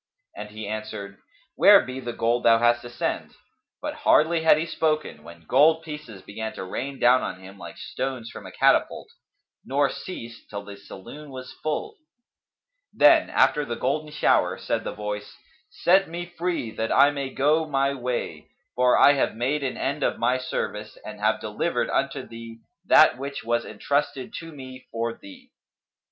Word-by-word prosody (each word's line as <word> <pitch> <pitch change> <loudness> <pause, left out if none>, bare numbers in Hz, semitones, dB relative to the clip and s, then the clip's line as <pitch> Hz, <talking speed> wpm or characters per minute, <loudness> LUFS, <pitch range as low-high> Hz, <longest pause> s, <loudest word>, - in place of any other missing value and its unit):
And - - -7
he 110 0 -7
answered, 105 -2 -6 0.3
"Where - - +8
be 130 +1 -6
the 120 -2 -5
gold 115 +1 0
thou 115 -1 +5
hast 120 +1 +3
to 120 - -9
send?" 120 - -3 0.5
But - - -3
hardly 160 +2 +3
had 160 -2 +5
he 160 - -1
spoken, 155 - -1
when 85 +1 -14
gold 155 - +4
pieces 150 - -9
began 110 +2 -6
to - - -6
rain 135 +9 -5
down 125 +1 +5
on 90 - -5
him, 95 +1 -13
like - - -10
stones 130 -3 -5
from - - -10
a - - -10
catapult, - - +2 0.5
nor 140 +1 +1
ceased 120 -10 -9
till 100 -1 -6
the 100 0 -10
saloon 145 +10 -11
was 130 -1 -9
full. 420 - -3 0.9
Then, - - +5
after 150 - +3
the 120 -4 -4
golden 155 +4 -2
shower, 150 - +2
said - - -2
the - - -4
Voice, 105 0 -6 0.3
"Set 190 0 +3
me 175 +1 -5
free, 175 -8 -3
that 110 +1 -3
I 140 +1 +6
may 140 -2 -4
go 150 +4 +1
my 140 -1 +1
way; 120 - -4 0.3
for 125 0 +3
I 145 - +7
have 135 - 0
made 135 +6 -1
an 130 - -3
end 140 +2 -2
of - - 0
my 125 +2 +1
service 105 -4 -4
and 105 -1 -8
have 110 +1 +1
delivered 105 -1 -2
unto - - -1
thee 115 0 -10 0.3
that 125 - +6
which 140 +1 -5
was 120 +1 0
entrusted 140 +3 -2
to 165 -1 -10
me 130 -3 -11
for 115 0 -2
thee." 260 - -15
130 Hz, 175 wpm, -25 LUFS, 110-150 Hz, 0.9 s, Where